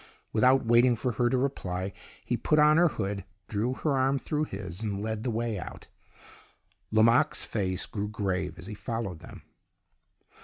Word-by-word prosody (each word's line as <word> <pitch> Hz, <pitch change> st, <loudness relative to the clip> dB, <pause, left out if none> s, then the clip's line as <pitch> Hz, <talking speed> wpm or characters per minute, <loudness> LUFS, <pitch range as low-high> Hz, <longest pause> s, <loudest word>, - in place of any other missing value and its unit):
Without 130 Hz, +3 st, +4 dB
waiting 120 Hz, +2 st, +5 dB
for 125 Hz, +3 st, -1 dB
her 120 Hz, +2 st, +1 dB
to 130 Hz, -, +1 dB
reply, 95 Hz, -8 st, -2 dB, 0.3 s
he -, -, 0 dB
put 155 Hz, -, +1 dB
on 150 Hz, +1 st, +6 dB
her 175 Hz, +1 st, +6 dB
hood, 100 Hz, -8 st, -3 dB, 0.2 s
drew 110 Hz, +4 st, -1 dB
her 145 Hz, 0 st, 0 dB
arm 135 Hz, +1 st, +2 dB
through 150 Hz, +2 st, -1 dB
his, 95 Hz, -, -6 dB
and 105 Hz, -3 st, -2 dB
led 110 Hz, -1 st, -2 dB
the 125 Hz, -, -2 dB
way 115 Hz, -2 st, -1 dB
out. -, -, -9 dB, 1.0 s
Lomaque's 110 Hz, +2 st, +4 dB
face 95 Hz, -3 st, -2 dB
grew 105 Hz, -1 st, -4 dB
grave 95 Hz, -3 st, -2 dB
as 85 Hz, -, -9 dB
he 105 Hz, -, -6 dB
followed 110 Hz, -5 st, -4 dB
them. -, -, -12 dB
110 Hz, 165 wpm, -28 LUFS, 100-130 Hz, 1.0 s, on